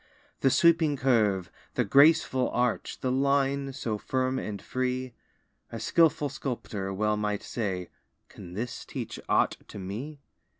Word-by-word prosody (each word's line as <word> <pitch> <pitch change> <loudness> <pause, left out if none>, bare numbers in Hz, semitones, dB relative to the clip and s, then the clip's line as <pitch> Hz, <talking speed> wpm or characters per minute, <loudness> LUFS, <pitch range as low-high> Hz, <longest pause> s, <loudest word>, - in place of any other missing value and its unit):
The 135 - +4
sweeping 165 -1 +4
curve, 105 -9 +2 0.2
the - - +2
graceful 140 -3 +5
arch, 125 -1 -1
The 130 - 0
line 140 +1 +1
so 115 -5 -3
firm 130 +2 -1
and 105 -2 -5
free; 130 0 -2 0.6
A 115 - -5
skilful 155 +4 +3
sculptor 105 -8 -4
well 105 +2 0
might 105 -1 -2
say: 95 -6 -3 0.4
"Can 90 - -11
this 115 +3 -4
teach - - -6
aught - - +3
to - - -10
me?" 110 +11 -6
125 Hz, 135 wpm, -28 LUFS, 105-140 Hz, 0.6 s, graceful